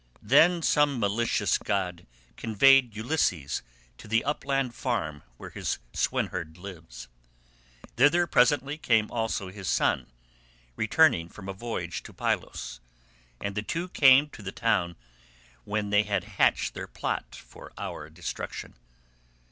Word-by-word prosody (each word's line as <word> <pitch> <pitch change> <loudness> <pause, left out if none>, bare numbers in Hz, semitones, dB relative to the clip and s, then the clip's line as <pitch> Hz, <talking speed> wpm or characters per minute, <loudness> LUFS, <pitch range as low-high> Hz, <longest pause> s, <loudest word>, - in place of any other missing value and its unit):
"Then 175 0 +5
some 145 -4 +3
malicious 110 +3 +1
god 90 -3 -2 0.3
conveyed 120 +2 +4
Ulysses 110 - 0 0.4
to - - -12
the 115 +2 +2
upland 135 -3 -1
farm 75 -8 -2 0.2
where - - -9
his - - -3 0.2
swineherd 80 +2 -2
lives. 80 -11 -10 0.9
Thither 155 +7 +5
presently 145 +1 +2
came 115 -6 +2
also 110 -5 -2
his 95 -1 -8
son, 65 -7 +1 0.7
returning 110 - +3
from 95 0 -11
a 95 - -4
voyage 95 -6 -4
to - - -12
Pylos, - - -3 0.6
and 100 - -3
the 105 - -2
two 170 +11 -4
came 135 -2 +6
to 110 - -12
the 95 -2 -5
town 100 -8 0 0.7
when 105 -1 -2
they 105 0 +5
had 105 -1 -1
hatched - - +1
their - - -6
plot - - -4
for - - -13
our 75 +1 -6
destruction. 85 +2 -6
105 Hz, 130 wpm, -27 LUFS, 90-135 Hz, 0.9 s, came